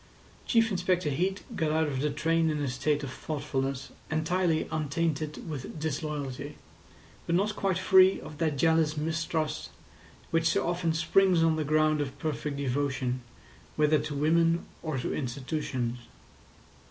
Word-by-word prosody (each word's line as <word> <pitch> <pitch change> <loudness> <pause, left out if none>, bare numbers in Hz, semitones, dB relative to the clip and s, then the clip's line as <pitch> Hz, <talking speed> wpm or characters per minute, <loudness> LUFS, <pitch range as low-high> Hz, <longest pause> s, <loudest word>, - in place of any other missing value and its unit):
Chief 225 -2 +3
Inspector 180 -2 +1
Heat 185 +7 -1
got 155 -2 0
out 160 0 +2
of 135 -3 -2
the 150 +2 +1
train 160 +2 +1
in 150 -1 -1
a 145 - -1
state 145 +3 0
of 130 -2 -5
thoughtfulness 135 -3 -3 0.2
entirely 160 +1 +1
untainted 155 0 -2
with 150 0 -6
disloyalty, 145 -2 -4 0.7
but 170 - +2
not 210 +4 +1
quite 195 -3 0
free 190 0 +6
of 150 - -10
that 155 -4 0
jealous 160 +1 +3
mistrust 160 0 -2 0.6
which 165 0 +3
so 170 - +1
often 175 -1 0
springs 175 +1 +4
on 165 -1 +3
the 155 - -1
ground 155 0 +2
of 135 -2 -4
perfect 150 -2 -3
devotion, 130 -2 -1 0.5
whether 150 0 +4
to 145 - -4
women 165 +3 +3 0.2
or 155 -4 -3
to 125 - -2
institutions. 130 -2 -3
155 Hz, 145 wpm, -29 LUFS, 145-165 Hz, 0.7 s, free